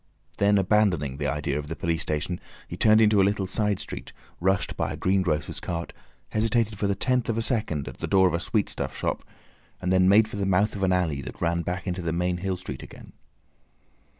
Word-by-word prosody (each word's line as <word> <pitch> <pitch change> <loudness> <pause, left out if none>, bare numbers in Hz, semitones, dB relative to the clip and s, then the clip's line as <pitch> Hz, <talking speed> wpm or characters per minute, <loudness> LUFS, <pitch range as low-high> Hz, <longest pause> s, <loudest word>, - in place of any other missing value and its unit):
Then 100 0 +4
abandoning 95 -9 +2
the 75 0 -2
idea 75 -1 -1
of 75 - -6
the 80 - -4
police 85 0 -1
station 75 +4 -2 0.3
he - - -6
turned 110 0 +5
into 105 -2 +5
a - - +5
little 100 0 +1
side 105 +1 0
street, - - -7 0.3
rushed 95 +2 +1
by - - -1
a - - -5
greengrocer's 90 -5 0
cart, 85 -1 -4 0.4
hesitated 110 -1 0
for 100 - +1
the 100 - +1
tenth 125 +4 0
of 115 - 0
a 115 - 0
second 105 - -1
at - - -8
the - - -3
door 95 -1 +5
of 90 - -1
a 85 - +1
sweetstuff 105 +2 -2
shop, - - -2 0.6
and 90 +1 0
then 95 0 +5
made 105 +2 +6
for 105 - -7
the 100 - -1
mouth 100 +3 +2
of 100 - -5
an 95 -1 +2
alley 85 -6 0
that - - -9
ran 85 0 0
back 90 +2 -4
into 90 -1 -2
the 85 -1 -2
main 90 +1 0
Hill 95 +1 -2
Street 70 -8 -7
again. - - -12
95 Hz, 220 wpm, -26 LUFS, 85-105 Hz, 0.6 s, made